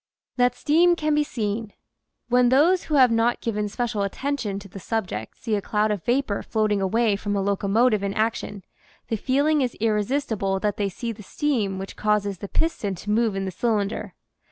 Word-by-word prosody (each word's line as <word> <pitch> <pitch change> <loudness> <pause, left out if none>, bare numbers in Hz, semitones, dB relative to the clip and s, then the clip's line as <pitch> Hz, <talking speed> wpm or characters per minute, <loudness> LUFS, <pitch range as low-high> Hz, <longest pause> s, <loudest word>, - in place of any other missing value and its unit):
THAT 245 0 +3
STEAM 345 +4 +4
CAN 305 -2 0
BE 300 0 +3
SEEN 215 -5 -3 0.6
those 265 +9 +4
who 305 - -1
have 255 -4 +6
not 230 +1 +2
given 210 -2 -2
special 225 -2 -2
attention 220 0 -2
to 200 0 -9
the 195 +1 -10
subject 180 - -4
see 225 - -3
a 205 - +1
cloud 210 +1 0
of 200 -5 -3
vapor 240 -4 0
floating 215 -2 0
away 215 +2 +2
from 205 0 -3
a - - +1
locomotive 205 +3 +2
in 200 0 -2
action, 215 -3 -2 0.5
the 225 - 0
feeling 285 +7 +2
is 250 -2 -2
irre 210 -1 +2
sistible 215 -6 -1
that 205 0 -1
they 200 -1 0
see 230 +5 -4
the 215 -1 -10
steam 210 -4 -1
which 195 +1 -7
causes 205 -3 0
the 200 - -6
piston 215 - -1
to 205 +4 -5
move 220 -1 +2
in 195 0 -2
the 190 - -3
cylinder. 210 +1 -1
215 Hz, 190 wpm, -24 LUFS, 200-250 Hz, 0.6 s, have